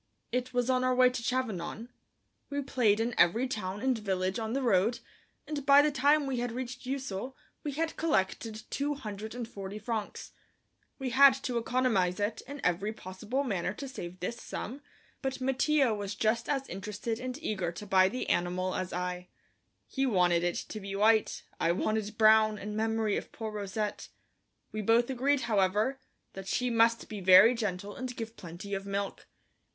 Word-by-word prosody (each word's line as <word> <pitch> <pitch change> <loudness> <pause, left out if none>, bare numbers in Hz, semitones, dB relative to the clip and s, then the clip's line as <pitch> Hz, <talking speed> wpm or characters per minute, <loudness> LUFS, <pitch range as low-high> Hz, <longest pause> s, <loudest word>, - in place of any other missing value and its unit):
It 250 +1 -1
was 245 -1 0
on 255 -1 +2
our 255 0 +2
way 250 0 +6
to 250 -1 -4
Chavanon. 230 -2 -2 0.6
We 285 0 -2
played 230 -6 +2
in 235 +2 0
every 225 +10 +4
town 205 -4 -4
and 260 -1 +2
village 190 -2 -1
on 220 0 -3
the 270 +1 -1
road, 225 +1 +3 0.5
and 295 -2 -3
by 280 +1 +7
the 300 - +2
time 290 +2 +3
we 265 -3 -2
had 245 0 -2
reached 255 +1 -6
Ussel 260 -2 -4 0.3
we 290 - -3
had 320 +3 -2
collected 220 -6 -1
two 290 +1 -1
hundred 220 -3 -7
and 240 -2 -4
forty 200 -2 -7
francs. 215 0 -4 0.7
We 265 -2 -3
had 270 +2 +7
to 245 -2 0
economize 225 -7 +1
in 230 +7 -3
every 180 +4 +1
possible 215 +7 -4
manner 195 -6 -2
to 275 - -6
save 180 -9 -7
this 235 +6 -4
sum, 260 +7 -6 0.4
but 265 -1 -3
Mattia 265 0 +2
was 205 -1 -4
just 220 +2 0
as 275 -2 0
interested 210 +4 -4
and 255 +1 -4
eager 195 - -2
to 210 - -8
buy 190 -1 +4
the 250 - -4
animal 180 +1 0
as 185 0 -3
I. 180 0 -3 0.6
He 270 0 -1
wanted 180 -6 +3
it 175 0 0
to 215 - -5
be 195 -1 -6
white; 220 +2 +3 0.2
I 170 - +2
wanted 215 +2 -1
brown 215 -1 +5
in 210 +1 -6
memory 220 -1 0
of - - -6
poor 220 -1 -5
Rousette. 210 0 -3 0.6
We 215 - -3
both 230 +4 +3
agreed, 265 +2 +1
however, 215 +3 +1 0.3
that 195 0 -8
she 250 +3 0
must 230 0 +3
be 210 -2 -6
very 190 +6 +8
gentle 205 -3 -3
and 255 -1 -5
give 225 -1 -6
plenty 175 +4 -8
of 195 0 -3
milk. 200 0 -3
220 Hz, 175 wpm, -30 LUFS, 195-255 Hz, 0.7 s, very